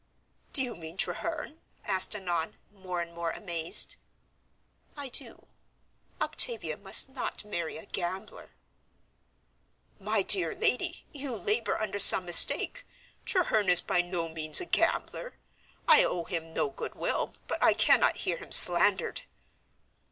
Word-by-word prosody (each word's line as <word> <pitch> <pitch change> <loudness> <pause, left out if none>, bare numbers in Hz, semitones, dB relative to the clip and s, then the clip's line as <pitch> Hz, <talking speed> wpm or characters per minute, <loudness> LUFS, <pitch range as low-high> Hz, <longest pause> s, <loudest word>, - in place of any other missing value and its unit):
"Do 270 - +1
you 245 -2 -8
mean 165 +1 -13
Treherne?" 320 - -6 0.3
asked 190 +1 0
Annon, 175 -5 -6 0.2
more 185 -3 -8
and 170 0 -10
more 170 0 -6
amazed. 170 -3 -1 1.0
"I 280 -2 -8
do. - - -6 0.7
Octavia 230 - -1
must 195 - +1
not 260 -5 -7
marry 170 -7 -7
a 160 - -14
gambler!" 185 0 -8 1.5
"My 210 0 -2
dear 180 -4 +6
lady, 250 - -3
you 275 -4 -8
labor 220 +2 -4
under 205 -2 -6
some 190 -1 +6
mistake; 175 - +4 0.4
Treherne 220 - -1
is 180 - +5
by 175 - -2
no 175 -1 -6
means 155 -1 -1
a - - -6
gambler. - - -3 0.5
I - - +4
owe 170 - -4
him 165 -2 -8
no 155 - -4
goodwill, 135 - -6
but - - -6
I - - +2
cannot - - +1
hear - - -3
him - - -15
slandered." - - +8
190 Hz, 130 wpm, -26 LUFS, 170-225 Hz, 1.5 s, slandered